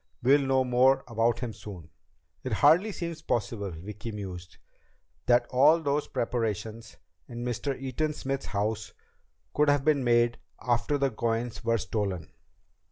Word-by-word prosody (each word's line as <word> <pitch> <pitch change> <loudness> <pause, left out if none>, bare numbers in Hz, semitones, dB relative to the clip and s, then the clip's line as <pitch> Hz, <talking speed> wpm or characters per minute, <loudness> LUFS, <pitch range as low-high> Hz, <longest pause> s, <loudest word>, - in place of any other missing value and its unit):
We'll 140 +3 +5
know 135 -1 +2
more 130 +2 +3
about 115 0 +1
him 120 -3 -3
soon." 95 -6 -10 0.5
"It 130 - -2
hardly 165 - +5
seems 170 -4 -5
possible," 105 -3 -2
Vicki 105 +7 -7
mused, 95 -4 -8 0.7
"that 120 0 +4
all 145 +6 +5
those 145 -1 -1
preparations 115 -1 -3 0.3
in 120 0 -6
Mr. 130 +3 -2
Eaton 135 +4 -2
Smith's 135 -1 -4
house 105 +2 -2 0.6
could 150 0 +3
have 145 -1 +2
been 150 -3 +3
made 120 0 +3 0.2
after 120 +4 0
the 135 -1 +1
coins 115 +1 -2
were 115 0 +2
stolen." 100 -5 -3
120 Hz, 140 wpm, -28 LUFS, 110-135 Hz, 0.7 s, We'll